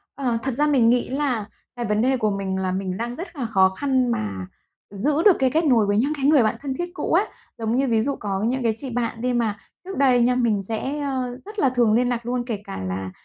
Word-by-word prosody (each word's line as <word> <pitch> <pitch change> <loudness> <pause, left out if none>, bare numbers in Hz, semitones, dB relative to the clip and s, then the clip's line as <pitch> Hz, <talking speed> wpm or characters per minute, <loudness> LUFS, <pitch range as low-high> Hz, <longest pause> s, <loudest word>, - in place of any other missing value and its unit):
Ờ, 245 -4 -1
thật 265 - -1
ra 300 +1 +3
mình 250 -6 +4
nghĩ 245 0 +2
là 260 -6 -1 0.3
cái 240 -1 -3
vấn 210 +1 +1
đề 260 +1 +2
của 215 -3 +1
mình 195 -1 -2
là 185 -1 -1
mình 185 0 -3
đang 240 +1 -4
rất 350 +1 -8
là 255 -4 -3
khó 190 -4 +4
khăn 260 +3 0
mà 95 - -3 0.4
giữ 285 - 0
được 395 - +7
cái 260 -1 +3
kết 320 +1 +1
nối 235 -7 +4
với 205 +1 +1
những 280 +7 +2
cái 270 - -2
người 290 -5 +5
bạn 215 - +1
thân 275 -2 -3
thiết 350 0 -3
cũ - - -3
ấy. - - +4 0.3
Giống 225 +1 -1
như 270 +1 +2
ví 225 -2 +2
dụ 280 +3 -1
có 200 -1 -3
những 255 0 -1
cái 225 -1 +2
chị 265 +3 -4
bạn 230 -1 -3
đi 250 0 0
mà 225 -3 0 0.3
trước 385 - -6
đây 255 -3 +4
nha, 250 +1 +3
mình 220 -5 +1
sẽ, 260 +8 -3
ờ, 260 -3 -3
rất 420 0 -8
là 270 - +4
thường 240 -4 +2
liên 245 +2 +2
lạc 240 -1 -2
luôn, 245 0 -1
kể 215 -5 -4
cả 95 - -7
là 95 0 -4
240 Hz, 265 wpm, -23 LUFS, 215-270 Hz, 0.4 s, được